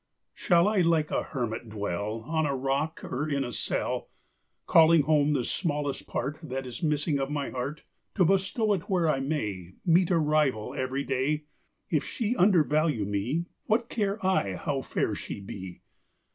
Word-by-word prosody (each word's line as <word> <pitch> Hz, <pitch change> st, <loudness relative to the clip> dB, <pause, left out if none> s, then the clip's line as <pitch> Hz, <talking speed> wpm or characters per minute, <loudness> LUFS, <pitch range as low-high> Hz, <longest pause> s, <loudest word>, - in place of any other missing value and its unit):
Shall 175 Hz, +1 st, +3 dB
I 210 Hz, -1 st, +2 dB
like 165 Hz, -3 st, +2 dB
a -, -, +1 dB
hermit 120 Hz, -4 st, -4 dB
dwell, 105 Hz, +1 st, -3 dB
On 160 Hz, +5 st, 0 dB
a 140 Hz, -, -1 dB
rock, 140 Hz, +5 st, -1 dB
or 150 Hz, +5 st, -3 dB
in 140 Hz, -2 st, 0 dB
a 120 Hz, -, -4 dB
cell, -, -, -2 dB, 0.6 s
Calling 165 Hz, -1 st, +6 dB
home 150 Hz, 0 st, +3 dB
the 130 Hz, -4 st, 0 dB
smallest 145 Hz, -5 st, -2 dB
part 140 Hz, +5 st, -3 dB
That 135 Hz, -4 st, -4 dB
is 125 Hz, +4 st, -7 dB
missing 150 Hz, -2 st, +1 dB
of 135 Hz, 0 st, -1 dB
my 145 Hz, -2 st, -2 dB
heart, 135 Hz, +4 st, -4 dB, 0.3 s
To 185 Hz, -, +4 dB
bestow 195 Hz, +4 st, +2 dB
it 190 Hz, +1 st, -4 dB
where 180 Hz, -4 st, +2 dB
I 150 Hz, -3 st, +2 dB
may 105 Hz, -, -3 dB
Meet 175 Hz, 0 st, +4 dB
a 175 Hz, -, +3 dB
rival 150 Hz, -8 st, +1 dB
every 130 Hz, +2 st, -2 dB
day? 140 Hz, +3 st, 0 dB, 0.5 s
If -, -, +2 dB
she 235 Hz, -1 st, -2 dB
undervalue 155 Hz, -, +3 dB
me, 110 Hz, +12 st, -1 dB, 0.2 s
What 230 Hz, +2 st, +1 dB
care 205 Hz, -2 st, -1 dB
I 100 Hz, -, +1 dB
how 135 Hz, +8 st, -2 dB
fair -, -, -1 dB
she -, -, -6 dB
be? 95 Hz, -2 st, -8 dB
150 Hz, 170 wpm, -28 LUFS, 130-165 Hz, 0.6 s, Calling